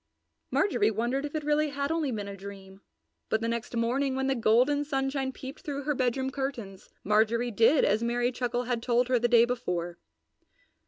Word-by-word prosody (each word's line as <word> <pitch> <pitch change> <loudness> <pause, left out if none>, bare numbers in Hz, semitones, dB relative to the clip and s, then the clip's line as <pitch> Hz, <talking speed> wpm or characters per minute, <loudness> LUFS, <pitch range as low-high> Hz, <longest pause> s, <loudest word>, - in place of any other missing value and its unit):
Marjorie 240 - +2
wondered 240 +6 -1
if 295 - -6
it 310 - -2
really 300 +1 +1
had 280 +1 -2
only 320 -4 0
been 210 -3 -4
a 200 - -6
dream, 195 0 -11 0.5
but 220 - +1
the 230 - -2
next 235 +1 -3
morning 260 +4 0
when 265 0 -1
the 270 - +2
golden 250 +5 +3
sunshine 270 -2 -1
peeped 265 +2 -9
through 280 -1 -4
her 295 +2 0
bedroom 260 0 0
curtains, 245 -9 -5
Marjorie 225 +3 +2
did 230 +7 +4
as 210 +2 +2
Merry 240 +1 0
Chuckle 245 -1 -2
had 245 -1 -2
told 240 +1 +1
her 250 -2 +3
the 240 - +2
day 235 -1 +6
before. 180 -8 -3
245 Hz, 190 wpm, -28 LUFS, 225-270 Hz, 0.5 s, day